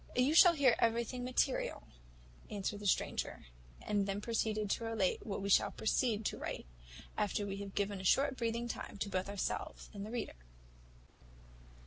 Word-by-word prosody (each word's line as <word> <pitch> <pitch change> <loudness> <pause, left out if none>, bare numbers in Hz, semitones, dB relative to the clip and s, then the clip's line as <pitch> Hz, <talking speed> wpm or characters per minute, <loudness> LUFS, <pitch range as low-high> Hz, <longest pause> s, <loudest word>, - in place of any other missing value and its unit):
"You 255 +4 +3
shall 345 +1 +8
hear 270 -5 +5
everything 235 +2 +1
material," 255 +1 0 0.7
answered 205 0 -3
the 205 - -3
stranger; - - 0 0.4
and 205 -1 0
then 195 0 -1
proceeded 215 -1 -1
to - - 0
relate 225 -4 0
what 195 -2 -3
we 200 - -2
shall - - +5
proceed 220 -1 0
to - - -2
write, - - -4 0.5
after 205 0 0
we 195 -1 -4
have 200 -1 -7
given 200 -1 -1
a - - -9
short 270 +8 +3
breathing 235 0 -1
time 225 - -6
to 200 0 -2
both 190 0 -2
ourselves 200 -2 -4
and 200 -1 -6
the 210 - -6
reader. 235 - -4
215 Hz, 165 wpm, -35 LUFS, 200-240 Hz, 0.7 s, shall